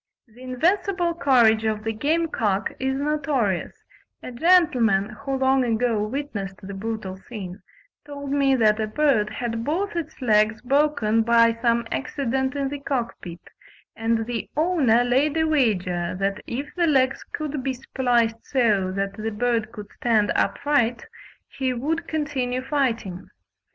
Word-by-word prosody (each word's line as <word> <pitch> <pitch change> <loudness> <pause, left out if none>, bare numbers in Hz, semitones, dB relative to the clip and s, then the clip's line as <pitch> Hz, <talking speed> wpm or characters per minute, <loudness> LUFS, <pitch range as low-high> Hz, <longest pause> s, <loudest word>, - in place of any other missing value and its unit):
The 230 +2 -18
invincible 345 +7 0
courage 240 -8 +4
of 215 -1 -1
the 225 0 -2
game 315 +9 0
cock 205 -8 -1
is 265 +1 -1
notorious: 275 - -1 0.5
a - - -6
gentleman 245 - +3
who 240 +5 -6
long 265 0 +2
ago 230 -2 +1
witnessed 210 -5 -4
the 200 +1 -7
brutal 195 -2 -5
scene, 190 -3 -8 0.4
told 285 -1 -7
me 275 -1 +3
that 215 -3 +3
a 215 - 0
bird 230 -4 +2
had 230 +1 -4
both 350 - -2
its 320 -2 -5
legs 215 -3 +2
broken 270 -5 +2
by 230 0 +4
some 235 -1 +2
accident 265 -1 -2
in 275 -1 -1
the 285 +1 -5
cockpit, 235 -11 -4 0.5
and 225 0 0
the 235 -1 -4
owner 300 -8 +3
laid 275 +5 +1
a 320 - +3
wager 185 - 0
that 195 +1 -1
if 280 +5 -5
the 345 -2 +1
legs 265 -3 +2
could 300 -2 -5
be 265 0 -2
spliced 240 -3 0
so 210 -8 +1
that 195 +1 -2
the 220 +1 -2
bird 225 0 -1
could 210 -1 -10
stand 220 -4 +2
upright, 240 -5 +1 0.4
he 260 -2 -2
would 305 +7 -2
continue 265 -5 -2
fighting. 235 -10 -2
245 Hz, 145 wpm, -24 LUFS, 220-285 Hz, 0.5 s, courage